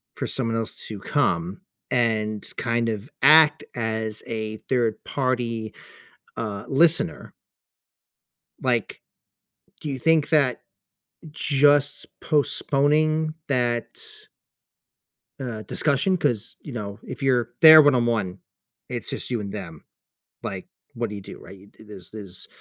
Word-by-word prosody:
for - - -3
someone 115 -3 -1
else 115 -1 -3
to 105 -3 -7
come 165 - -1 0.3
and 110 -3 0
kind 115 -1 0
of 110 +3 -5
act 155 +2 +7
as 110 -2 -2
a 110 -1 -4
third-party, 120 -1 -1 0.6
uh, 105 -3 -4
listener?" 160 - +2 1.3
Like, - - -1 0.8
do 150 - -5
you 135 -2 -4
think 160 +1 +3
that 140 -6 +2 0.7
just 145 -1 +2
postponing 155 +2 +1
that 120 -3 -1 1.4
uh, 120 -5 -5
discussion? 145 - +1
'Cause, 120 -10 -1
you 145 - -9
know, 100 -3 -6
if - - -8
you're 125 -3 +2
there 155 -1 +11
1-on-1, 120 -9 +2 0.5
it's - - -3
just - - -4
you 120 - 0
and 100 -1 -6
them, 85 -7 -8 0.6
like, - - -5 0.3
what 115 -1 -3
do 105 - -6
you 100 - -7
do, - - -11
right? 100 +1 -14
Th 110 - -17
there's 95 -4 -10
there's 100 -4 -6
120 Hz, 120 wpm, -24 LUFS, 110-145 Hz, 1.4 s, there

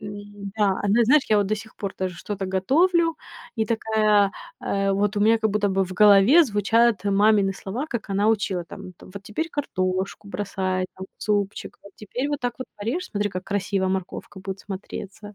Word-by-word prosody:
н-да, 205 -1 -3
она, 210 +4 +3
знаешь, 285 +5 +5
я 215 -1 +4
вот 200 - +1
до 215 +1 0
сих 220 +1 -11
пор 200 -2 -5
даже 185 -1 -3
что-то 195 0 -4
готовлю, 330 - +2 0.4
и 220 - +1
такая, 215 -3 +2 0.3
э, 195 0 0
вот 205 +2 0
у 205 - +1
меня 225 +2 +4
как 220 -1 +1
будто 205 0 +1
бы 195 0 +1
в 185 - -8
голове 210 - +7
звучат 220 -2 +2
мамины 200 0 +3
слова, 210 +9 -5
как 235 -6 -5
она 200 +2 +2
учила 195 -5 0
там: 185 +2 -10
там 180 - -16
вот 200 - -8
теперь 215 +11 -3
картошку 190 -7 -2
бросай 190 -2 -2
там 190 0 -7
в - - -11
супчик, 205 -1 -2
вот 200 - -14
теперь 245 +6 -4
вот 290 -1 -2
так 245 -1 -2
вот 255 - -6
порежь, 245 - -3
смотри, 205 -1 -1
как 185 -1 -5
красиво 195 -1 -1
морковка 190 +1 -4
будет 190 0 -6
смотреться. 200 +1 -8
205 Hz, 190 wpm, -24 LUFS, 195-220 Hz, 0.4 s, голове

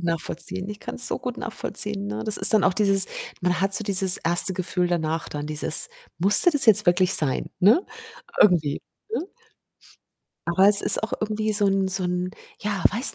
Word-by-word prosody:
nachvollziehen. 175 +2 -6
Ich 210 - -11
kann's 245 - -6
so - - -4
gut 250 -1 -8
nachvollziehen, 205 -3 -3
ne? 205 - -7
Das 215 -1 -2
ist - - +9
dann 210 - +1
auch - - +1
dieses 195 -1 +4 0.4
man 180 0 -2
hat 195 +1 -1
so 215 - 0
dieses 190 -2 +2
1. 175 +3 +2
Gefühl 180 0 -4
danach 165 -1 -4
dann, 145 0 -8
dieses: 155 +1 -2 0.3
„Musste 200 - +6
das 290 -4 +5
jetzt 210 -2 +3
wirklich 180 +1 +1
sein?“, 145 -7 0
ne? 225 - +2 0.6
Irgendwie 160 -7 +1 0.3
ne? 440 - -4 1.3
Aber 190 +3 +2
es 205 -1 +6
ist - - +6
auch 220 - -6
irgendwie 215 0 -4
so 205 -1 0
'n 195 0 -1
so 190 0 -3
'n 180 0 -5 0.3
ja, 205 -3 -5
weiß 235 +6 +2
195 Hz, 185 wpm, -21 LUFS, 175-210 Hz, 1.3 s, ist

